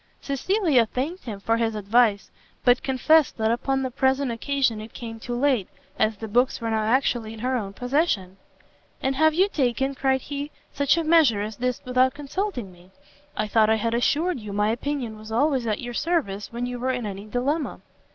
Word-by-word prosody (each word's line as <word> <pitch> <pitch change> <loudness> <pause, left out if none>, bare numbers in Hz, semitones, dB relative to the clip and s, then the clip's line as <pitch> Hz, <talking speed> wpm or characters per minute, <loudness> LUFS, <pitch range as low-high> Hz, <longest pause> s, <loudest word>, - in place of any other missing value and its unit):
Cecilia 280 - +1
thanked 295 +11 -4
him 210 -5 -5
for 225 +3 +1
his 225 -1 0
advice, 210 -1 +2 0.3
but 245 0 +5
confessed 280 +3 +3
that 220 0 +1
upon 265 +3 0
the 260 - -3
present 265 0 +1
occasion 240 -2 0
it 220 - -10
came 225 -2 -7
too 240 +2 -4
late, 250 -6 +1 0.3
as 215 -1 +2
the 220 - -6
books 245 +5 +2
were 230 -1 -2
now 220 0 +1
actually 230 -1 +1
in 220 - -10
her 255 +1 0
own 205 -5 -3
possession. 245 - 0 0.7
"And 265 0 +1
have 315 +2 +3
you 375 +4 +4
taken," 270 - 0
cried 265 -1 +1
he, 285 +2 -5 0.2
"such 280 +3 +2
a 335 - +1
measure 310 -11 +4
as 215 0 -6
this 250 0 -2
without 255 +1 +2
consulting 290 - -4
me? 180 +1 -19 0.5
I 215 - 0
thought 215 0 +3
I 220 - +4
had 230 +1 -1
assured 300 +7 +1
you 210 -2 -7
my 210 +1 +2
opinion 240 -3 -3
was 215 +1 -10
always 260 0 +1
at 215 - -1
your 240 -1 -5
service 250 - -1
when 240 +1 -3
you 245 0 -4
were 255 +2 -1
in 245 -3 -3
any 200 0 -6
dilemma." 275 +7 -2
245 Hz, 200 wpm, -24 LUFS, 220-275 Hz, 0.7 s, but